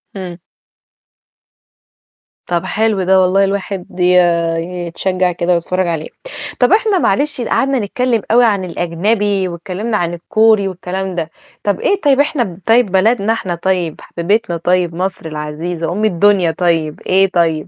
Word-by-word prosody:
إمم. 180 -3 -6 2.1
طَب 175 -1 -1
حلو 215 -3 0
ده 190 +1 +4
والله 190 +2 +3
الواحد 195 -2 -3
ي 180 0 +4 0.7
يتشجع 185 +1 0
كده 175 +1 0
ويتفرج 180 +2 -1
عليه. 160 -2 -3 0.5
طَب - - +3
إحنا 425 -3 +3
معلش 285 +5 +1
قعدنا 270 +2 0
نتكلم 230 +2 0
أوي 240 +1 +5
عن 200 -4 +1
الأجنبي 190 +3 0
واتكلمنا 190 +6 -3
عن 175 -2 -2
الكوري 215 +3 +2
والكلام 185 0 -4
ده. 165 -2 -3 0.3
طَب 200 -3 0
إيه 400 0 0
طيب 280 -2 +3
إحنا 240 - 0
طيب 225 -3 +3
بلدنا 215 +3 +2
إحنا 185 -6 -3
طيب 175 -2 -2
حبيبتنا 175 0 -1
طيب 175 0 0
مصر 185 -1 -3
العزيزة 160 +3 -4
أُم 210 +4 -1
الدنيا 190 -2 +3
طيب 165 -3 -1
إيه 190 +1 +2
طيب؟ 165 -3 +1
185 Hz, 140 wpm, -16 LUFS, 175-210 Hz, 2.1 s, أوي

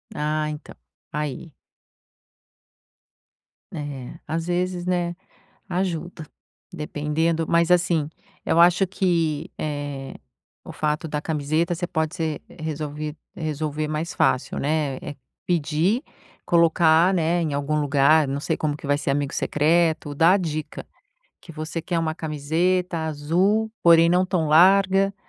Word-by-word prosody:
Ah, 150 0 -1
então, 150 +1 -8 0.4
aí. 150 +1 -4 2.2
É, 140 -4 -7
às 165 +2 -3
vezes, 180 0 -1
né, 175 -1 0 0.5
ajuda. 175 -3 -3 0.5
Dependendo 160 +1 -1
mas 170 +1 +2
assim, 170 -4 +2 0.4
eu 165 - +2
acho 175 +3 +5
que, 165 -5 0
eh, 145 -2 -5 0.5
o - - -9
fato 150 +1 -2
da 150 -1 -3
camiseta 155 +2 -1
você 175 +1 -3
pode 160 -1 -2
ser 160 -4 -3
resolvi 150 -1 -5 0.2
resolver 155 -2 -3
mais 155 +3 -3
fácil, 130 - +1
né, 145 -2 -1
é 145 - -7 0.3
pedir, 170 - +1 0.4
colocar, 170 +1 +4
né, 170 0 +1
em 155 -3 -1
algum 145 +2 -1
lugar, 145 +1 +4
não 140 +1 -2
sei - - -2
como 150 -2 -1
que - - -10
vai 145 0 +2
ser 140 - -3
amigo 140 0 -1
secreto, 160 -1 +1
dar 170 +6 +5
dica, 155 -3 -4 0.6
que 165 - -12
você 155 +2 -5
quer 170 -1 -1
uma 160 -1 -1
camiseta 165 +4 -1
azul 180 +9 +1
porém 170 -1 +6
não 180 +2 +3
tão 175 -4 0
larga, 195 +4 +5
160 Hz, 130 wpm, -23 LUFS, 150-175 Hz, 2.2 s, porém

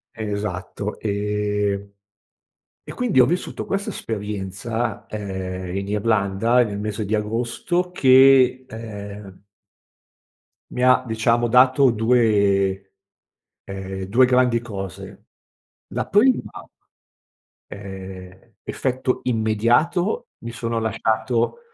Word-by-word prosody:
Esatto, 105 -1 -4
ehm 105 -1 -1 1.0
e - - -9
quindi 235 - +2
ho 125 - +7
vissuto 175 +5 -3
questa 200 +1 -2
esperienza, 105 +2 -4
ehm, 95 -3 -5
in 100 0 -3
Irlanda 105 +2 +1
e - - +5
nel 105 -2 -5
mese 105 0 -3
di 105 - -2
agosto 120 +12 -2
che, 130 -2 +5
ehm 105 -3 -9 1.3
mi 125 - -2
ha 130 0 +5
diciamo, 115 +1 +1
dato 130 +2 +5
2, 100 -4 +2 0.7
ehm, 95 0 -6
2 120 +7 +4
grandi 125 -2 +2
cose. 95 -6 -8 0.6
La - - -4
prima 230 - +4 1.3
ehm, 95 -2 -9 0.3
effetto 130 0 -2
immediato 125 - +1
mi 115 - -7
sono 115 0 -3
lasciato, 110 - -1
110 Hz, 95 wpm, -22 LUFS, 100-125 Hz, 1.3 s, ho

